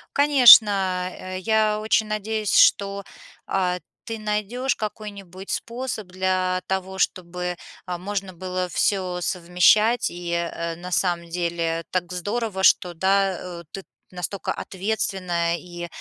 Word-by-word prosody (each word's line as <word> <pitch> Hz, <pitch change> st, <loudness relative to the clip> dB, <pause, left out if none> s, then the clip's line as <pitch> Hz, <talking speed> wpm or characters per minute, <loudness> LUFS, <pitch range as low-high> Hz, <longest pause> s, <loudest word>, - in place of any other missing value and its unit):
Конечно, 200 Hz, -9 st, +5 dB
я 215 Hz, +1 st, +1 dB
очень 220 Hz, 0 st, +1 dB
надеюсь, 215 Hz, -1 st, -2 dB
что, 200 Hz, 0 st, +4 dB, 0.4 s
а, 180 Hz, -2 st, 0 dB, 0.3 s
ты 225 Hz, -1 st, -5 dB
найдешь 215 Hz, +5 st, -1 dB
какой-нибудь 200 Hz, -3 st, -7 dB
способ 235 Hz, -4 st, -4 dB
для 185 Hz, 0 st, -1 dB
того, 190 Hz, 0 st, -3 dB
чтобы, 180 Hz, 0 st, -2 dB, 0.3 s
а, 180 Hz, -1 st, -4 dB
можно 195 Hz, +1 st, -4 dB
было 185 Hz, +1 st, -3 dB
всё 180 Hz, -1 st, 0 dB
совмещать, 180 Hz, +7 st, +3 dB
и, 175 Hz, 0 st, -6 dB
э, 170 Hz, -1 st, -3 dB
на 180 Hz, +2 st, -9 dB
самом 175 Hz, -2 st, 0 dB
деле, 165 Hz, -1 st, -2 dB
так 180 Hz, -1 st, -2 dB
здорово, 205 Hz, +2 st, -3 dB
что 180 Hz, -2 st, +4 dB
да, 190 Hz, +1 st, +1 dB
э, 175 Hz, -1 st, -8 dB
ты 195 Hz, -, -7 dB, 0.3 s
настолько 180 Hz, +1 st, -4 dB
ответственная, 185 Hz, -4 st, -1 dB
и, 175 Hz, 0 st, -8 dB
185 Hz, 120 wpm, -23 LUFS, 180-210 Hz, 0.4 s, Конечно